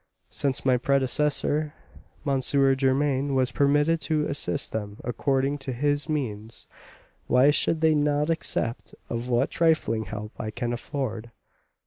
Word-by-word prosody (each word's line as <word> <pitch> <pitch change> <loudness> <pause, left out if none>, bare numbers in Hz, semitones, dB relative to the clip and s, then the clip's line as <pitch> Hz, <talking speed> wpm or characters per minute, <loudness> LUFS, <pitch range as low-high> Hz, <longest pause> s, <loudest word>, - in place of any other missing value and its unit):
Since 135 -3 -1
my 130 -1 +4
predecessor, 145 +3 +1 0.5
M. 135 -2 +1
Germain, 135 +1 +2
was 130 -2 +2
permitted 145 +5 +2
to 150 +1 0
assist 145 0 -2
them 105 -1 -5
according 135 +4 0
to 135 -1 -5
his 145 +5 0
means, 115 -7 -4 0.6
why 130 +4 +5
should 160 +2 +1
they 160 -1 +4
not 150 +1 +1
accept 125 -7 -2
of 120 +1 -4
what 120 -1 +1
trifling 155 -10 +1
help 105 +2 -6
I 110 - -3
can 120 +2 -3
afford?" 120 -3 -4
135 Hz, 130 wpm, -26 LUFS, 120-145 Hz, 0.6 s, why